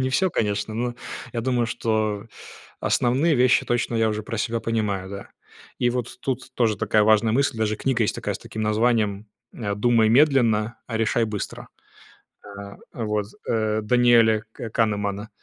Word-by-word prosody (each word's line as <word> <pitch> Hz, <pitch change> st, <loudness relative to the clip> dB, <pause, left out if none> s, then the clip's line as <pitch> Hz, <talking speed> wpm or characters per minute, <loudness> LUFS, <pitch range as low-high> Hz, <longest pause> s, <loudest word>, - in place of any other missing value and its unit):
Не 130 Hz, 0 st, 0 dB
всё, 185 Hz, +6 st, +2 dB
конечно, 105 Hz, -1 st, -1 dB
но 120 Hz, +1 st, -2 dB, 0.4 s
я 115 Hz, -, -2 dB
думаю, 120 Hz, -1 st, 0 dB
что 110 Hz, -2 st, -1 dB, 0.5 s
основные 140 Hz, +7 st, +2 dB
вещи 125 Hz, 0 st, +3 dB
точно 120 Hz, -1 st, 0 dB
я 110 Hz, -1 st, +2 dB
уже 105 Hz, 0 st, -2 dB
про 115 Hz, -, -5 dB
себя 115 Hz, +1 st, -1 dB
понимаю, 100 Hz, -4 st, -2 dB
да. 100 Hz, 0 st, -8 dB, 0.5 s
И 120 Hz, -, +2 dB
вот 125 Hz, -1 st, -4 dB
тут 130 Hz, -1 st, -4 dB
тоже 110 Hz, -4 st, +1 dB
такая 105 Hz, +2 st, +2 dB
важная 110 Hz, +1 st, +4 dB
мысль. 140 Hz, -1 st, +1 dB
Даже 110 Hz, -1 st, 0 dB
книга 125 Hz, 0 st, 0 dB
есть -, -, -1 dB
такая -, -, -3 dB
с -, -, -6 dB
таким 110 Hz, -, -6 dB
названием, 105 Hz, -1 st, +1 dB, 0.3 s
э, 100 Hz, -4 st, -3 dB
"Думай 115 Hz, 0 st, +3 dB
медленно, 120 Hz, -4 st, +3 dB
решай 115 Hz, 0 st, +1 dB
быстро". 105 Hz, -2 st, -5 dB, 0.8 s
А, 100 Hz, 0 st, -10 dB, 0.2 s
вот, 105 Hz, -3 st, -2 dB, 0.2 s
э, 110 Hz, -1 st, 0 dB
Даниэля 115 Hz, -2 st, +4 dB
К 115 Hz, -, -7 dB
Канемана. 105 Hz, -2 st, -1 dB
110 Hz, 160 wpm, -23 LUFS, 105-120 Hz, 0.8 s, важная